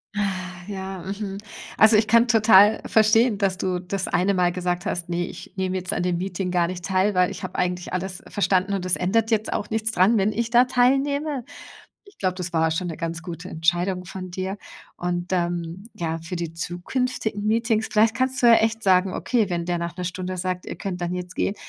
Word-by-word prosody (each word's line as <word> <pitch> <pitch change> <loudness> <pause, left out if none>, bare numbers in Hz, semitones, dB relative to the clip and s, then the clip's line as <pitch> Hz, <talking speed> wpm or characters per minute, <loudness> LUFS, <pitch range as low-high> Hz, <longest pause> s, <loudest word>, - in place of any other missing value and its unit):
Ah, 205 - +1 0.4
ja, 190 -2 -5
mhm. 195 +1 -5 0.4
Also, 220 0 +6
ich 215 0 +2
kann 230 +2 +5
total 215 -2 +6
verstehen, 220 0 +4
dass 190 -2 +1
du 180 -1 -1
das 185 +1 -3
eine 190 +2 +1
Mal 175 -1 +2
gesagt 180 0 -2
hast: 175 0 -3
„Ne, 175 0 -1
ich - - -10
nehme 190 -1 -2
jetzt 185 0 -3
an 175 - -1
dem 175 -1 0
Meeting 185 -1 -3
gar 175 -1 +2
nicht 180 -1 -6
teil, 190 +1 +1
weil 180 0 +3
ich - - -8
habe 185 - -6
eigentlich 180 0 -2
alles 185 0 -3
verstanden 190 0 +1
und 185 -1 -3
es 180 - +2
ändert 225 +5 +1
jetzt 220 -1 +1
auch 210 - -3
nichts 220 0 0
dran, 215 +4 +4
wenn 200 +3 +2
ich 230 +2 -2
da 245 +1 +6
teilnehme.“ 275 +2 +1 0.6
Ich 400 - -19
glaube, 185 -1 0
das 180 -2 -5
war 160 0 +2
schon 175 +2 -2
'ne 160 - -6
ganz 165 -1 -4
gute 175 0 -7
Entscheidung 175 +3 0
von 185 0 -7
dir. 190 +2 -4 0.4
Und 175 +1 -3
dann, 175 +1 -2
ja, 165 -1 -3
für 165 +3 -6
die 170 -1 -4
zukünftigen 205 +5 -3
Meetings, 225 0 +1
vielleicht 220 +1 +4
kannst 260 0 0
du - - +7
ja 230 - +8
echt 225 0 +1
sagen, 185 -1 +3
okay, 225 -6 0
wenn 170 -1 -2
der 175 -1 -1
nach 170 0 -4
'ner 180 - -3
Stunde 185 +1 -4
sagt: 180 0 -3
„Ihr - - -6
könnt 185 -2 -4
dann 175 +1 -2
jetzt 180 0 -6
gehen.“, 200 - -1
185 Hz, 215 wpm, -24 LUFS, 180-215 Hz, 0.6 s, ja